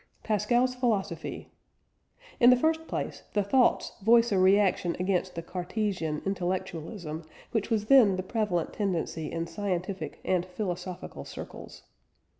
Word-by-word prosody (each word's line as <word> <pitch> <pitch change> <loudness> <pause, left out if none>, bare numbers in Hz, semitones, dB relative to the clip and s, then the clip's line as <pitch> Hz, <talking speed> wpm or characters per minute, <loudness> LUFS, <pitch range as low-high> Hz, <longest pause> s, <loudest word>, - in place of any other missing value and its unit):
PASCAL'S 240 +4 +2
PHILOSOPHY. 235 -6 -2 0.9
In 245 -2 +8
the 250 - +8
first 320 +5 0
place, - - -4
the 205 - +2
Thoughts 250 +5 +3
voice 230 +2 +5
a 195 - +3
reaction 190 -2 +3
against 185 0 0
the 170 - -4
"Cartesian 180 -3 -2
intellectualism" 175 -3 -3 0.3
which 225 -2 -1
was 215 -3 +1
then 225 -6 +6
the 185 - -3
prevalent 190 -5 -1
tendency 170 -6 -2
in 165 0 -2
scientific 180 -2 -3
and 180 -2 +2
philosophical 180 -1 -5
circles. - - -9
195 Hz, 125 wpm, -28 LUFS, 175-220 Hz, 0.9 s, In